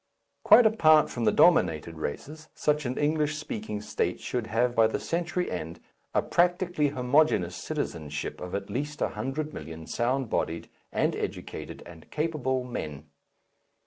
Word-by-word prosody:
Quite 245 - +8
apart 155 -8 +5
from 120 -2 -2
the 105 - +5
dominated 85 - +3
races, 155 - -6
such 150 -2 +1
an 125 - -3
English 150 0 +1
speaking 110 -8 -5
state - - -2
should 120 -3 -3
have 120 +3 +1
by 115 -2 +5
the 110 - -2
century 175 +1 -2
end 85 -1 -5 0.4
a - - +3
practically 175 -3 +2
homogeneous 125 - +2
citizenship 75 -4 -4
of 90 +1 -5
at 100 0 -3
least 145 +6 -3
a - - +1
hundred 150 +4 -4
million 80 +1 -8
sound 130 +6 0
bodied 85 -5 -2 0.2
and - - +1
educated - - -6
and 80 -2 -13
capable 145 -5 -1
men. 75 - -6
125 Hz, 145 wpm, -28 LUFS, -, 0.4 s, Quite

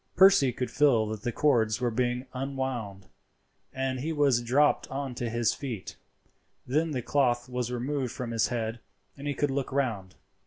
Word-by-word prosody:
Percy 190 -9 +6
could 125 +1 -4
feel 135 -6 +4
that 110 -2 -5
the 120 - -2
cords 115 -6 +2
were 125 -2 0
being 125 +2 -1
unwound, 130 -7 -4 0.7
and 130 -1 -2
he 155 +5 -2
was 140 -6 +3
dropped 135 +5 +2
on 135 -1 -4
to 120 -1 -3
his 115 -1 +1
feet; 120 -9 -6 0.7
then 155 +6 +1
the 130 -5 -3
cloth 125 -3 +1
was 125 -1 -3
removed 130 +1 -2
from 120 -2 -5
his 115 -3 +2
head, 115 -1 -3 0.4
and 140 +1 -7
he 145 - -1
could 145 -1 0
look 135 0 -2
round. 115 -9 -2
125 Hz, 170 wpm, -28 LUFS, 120-140 Hz, 0.7 s, Percy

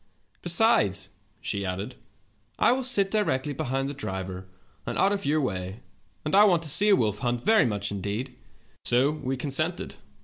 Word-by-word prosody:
'Besides,' 165 - +2 0.3
she 100 -1 -2
added, 95 +2 -4 0.6
'I - - +4
will 260 +1 0
sit 205 -6 +2
directly 150 -10 0
behind 135 -2 -2
the 140 - -4
driver, 95 -7 -6 0.4
and - - -4
out 195 - +3
of 200 -4 -2
your 155 +2 +2
way, 95 -4 -4 0.4
and 150 - -3
I 200 +2 +7
want 175 -5 +3
to 155 - -2
see 205 +9 +6
a 200 - +7
wolf 105 - 0
hunt 120 -1 -1
very 220 - +4
much 100 -2 -2
indeed.' 100 +6 -4 0.5
"So 130 +4 +3
we 135 -4 -4
consented. 155 +6 -3
135 Hz, 170 wpm, -26 LUFS, -, 0.6 s, I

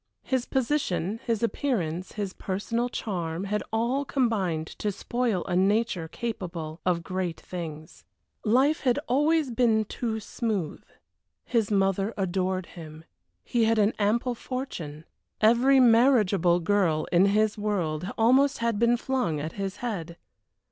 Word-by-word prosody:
His 260 -2 -1
position, 230 - -1
his 230 -1 0
appearance, 185 - -1
his 200 -3 -4
personal 230 +5 -2
charm, 175 -7 -3
had 210 +1 -1
all 235 +5 0
combined 205 - 0
to 210 - 0
spoil 230 -2 -1
a 180 - -2
nature 195 -2 +1
capable 170 -7 -5
of 170 -2 +1
great 185 -2 -3
things. 160 -3 -8 0.4
Life 265 +8 +3
had 250 -1 +1
always 295 +2 +2
been 225 -2 +2
too 220 +1 -3
smooth. 210 -6 -3 0.6
His 225 -4 +1
mother 195 +1 +1
adored 185 -1 -1
him. 160 -2 -11 0.4
He 235 -2 +1
had 225 0 +2
an 210 +1 +3
ample 235 +4 +1
fortune. 180 - -6 0.3
Every 240 +5 +5
marriageable 225 -8 +4
girl 170 -4 +1
in 185 +3 +5
his 210 +1 +2
world 185 -5 -2
almost 260 +5 +4
had 230 -3 -1
been 235 +1 +4
flung 245 - -1
at 155 +2 -4
his 195 -1 -4
head. 170 -7 -4
210 Hz, 135 wpm, -27 LUFS, 180-235 Hz, 0.6 s, Every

